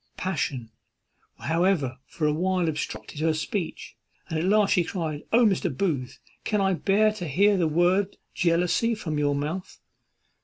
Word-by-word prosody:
Passion, 135 -10 -2 0.7
however, 160 -6 0
for 155 - -3
a 150 - +3
while 180 +2 0
obstructed 150 -1 -4
her 160 0 +1
speech, 160 +3 -4 0.3
and 160 - -1
at 165 - -1
last 205 +1 +3
she 180 - +3
cried, 160 -4 -4
"O, 235 +1 +5
Mr. 190 -3 +2
Booth! 145 -11 -1 0.3
can 210 - 0
I 195 -1 +2
bear 205 +4 +3
to 185 -5 -6
hear 200 +8 +3
the 175 -4 +2
word 180 +5 +2 0.2
jealousy 180 +7 +2
from 155 -8 -3
your 145 -1 +1
mouth?" 155 +6 -4
175 Hz, 155 wpm, -26 LUFS, 155-195 Hz, 0.7 s, O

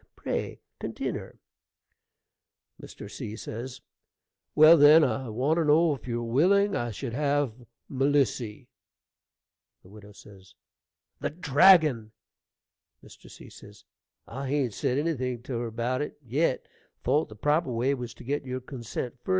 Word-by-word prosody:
Pray - - -4 0.2
continner. - - -5 1.4
Mr. - - -10
C. 105 +1 -7 1.2
Well, 155 +2 +8
then, 155 +1 +7
I 130 -2 -1
want 130 +9 0
to 165 - +1
know 155 +2 +4
if 135 - -10
you're 120 -1 -2
willing 190 - +2
I 120 - -2
should 115 +2 -6
have 145 -2 0 0.3
Melissy. 135 -4 0 1.2
Widow 105 +2 -14 1.1
The - - -2
dragon! 150 - +4 0.9
Mr. - - -16
C. - - -14 0.4
I 135 0 -6
hain't 135 -5 0
said 125 - -1
anything 130 -6 -2
to 125 -2 -4
her 120 - -3
about 120 +4 -2
it 150 - -5
yet, 135 +3 0 0.4
thought 150 +2 +1
the 110 - -11
proper 150 +5 0
way 125 +4 0
was 125 -3 -6
to - - -13
get 145 +4 -2
your 130 -1 -4
consent 125 -1 -7
first. 125 - -13
130 Hz, 125 wpm, -27 LUFS, 120-150 Hz, 1.4 s, Well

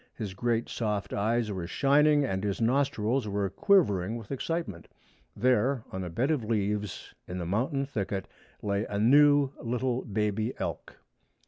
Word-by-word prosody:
His 105 -5 -5
great 115 +3 0
soft 105 -3 -2
eyes 110 +2 0
were 90 -4 -4
shining, 145 - +3
and 95 -6 -2
his 100 -2 -1
nostrils 125 -1 +1
were 100 -1 -1
quivering 110 - +2
with 110 0 -10
excitement. 135 - -3 0.5
There, 125 0 +2
on 95 0 -4
a 90 - -5
bed 120 - 0
of 145 -7 0
leaves 105 -2 -2
in 90 - -5
the 90 - -3
mountain 130 - 0
thicket, 100 -7 -3 0.4
lay 100 0 0
a 100 - -4
new 145 +4 +5
little 125 +1 -1
baby 110 +1 -1
elk. - - -5
110 Hz, 150 wpm, -28 LUFS, 100-135 Hz, 0.5 s, new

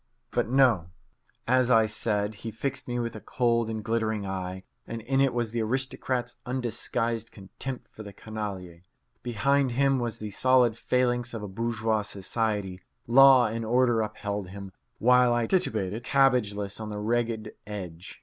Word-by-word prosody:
But 120 -2 0
no. 120 -10 +3 0.6
As 130 0 +3
I 115 -3 +5
said, 105 -1 -1
he 115 - -4
fixed 135 +5 -4
me 120 0 -2
with 120 -1 -3
a - - -8
cold 115 -2 +1
and 110 -1 -4
glittering 110 -2 -1
eye, 95 -1 -4 0.2
and 115 -1 -6
in 135 +3 +1
it 135 -1 +3
was 120 -2 -2
the 115 0 -1
aristocrat's 125 +1 -1
undisguised 115 -2 -2
contempt 120 +6 -7
for - - -11
the 100 -1 -8
canaille. 100 -5 -6 0.4
Behind 130 +3 +1
him 135 +1 +2
was 120 -2 -3
the 105 -1 -6
solid 125 +1 +3
phalanx 120 0 0
of 110 - -5
a - - -4
bourgeois 110 +1 -1
society. 100 -1 -2 0.2
Law 130 +1 +7
and 115 +1 -2
order 120 0 +3
upheld 105 -2 -4
him, 100 +1 -9 0.3
while 125 0 +4
I 120 -1 +1
titubated, 110 - 0
cabbageless, 110 -8 +2
on 110 - -5
the 105 - -5
ragged 115 +1 -1 0.2
edge. 90 -4 -7
115 Hz, 160 wpm, -27 LUFS, 105-125 Hz, 0.6 s, Law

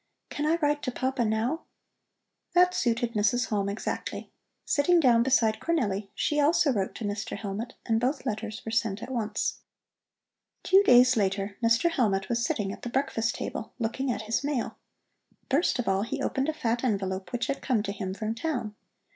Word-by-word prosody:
"Can 295 +1 -1
I 320 - +4
write 295 0 +2
to 255 - -2
Papa 260 0 -1
now?" 230 +8 -1 0.9
That 360 0 +5
suited 235 -5 0
Mrs. 215 +3 +1
Halm 200 -2 0
exactly. 200 - -4 0.3
Sitting 340 +5 +3
down 245 -6 +5
beside 235 -3 +3
Cornelli, 210 -12 -1
she 295 - 0
also 295 -1 +4
wrote 195 -4 -2
to - - -6
Mr. 205 +1 -3
Hellmut, 210 +3 -5
and 225 -1 +2
both 260 +4 -1
letters 215 0 -4
were 225 - -4
sent 225 -3 0
at - - -7
once. 215 -4 -2 1.0
Two 385 +1 +6
days 250 -7 +6
later 200 0 0
Mr. 230 +9 +3
Hellmut 195 -9 +1
was 235 0 0
sitting 200 -4 -1
at - - -11
the 245 - -5
breakfast 245 -3 0
table, 225 - -5
looking 250 +3 -1
at 220 - -3
his 225 +5 -1
mail. 280 -5 -2 0.7
First 285 +3 +2
of 245 - -2
all 195 0 +2
he 220 - -3
opened 270 +3 -1
a - - 0
fat 240 -6 -1
envelope 190 -5 -1
which 245 -1 -1
had 275 - -3
come 240 -6 +1
to 200 - -3
him 190 -2 -4
from 215 +2 -2
town. 235 -4 -3
230 Hz, 180 wpm, -28 LUFS, 210-270 Hz, 1.0 s, Two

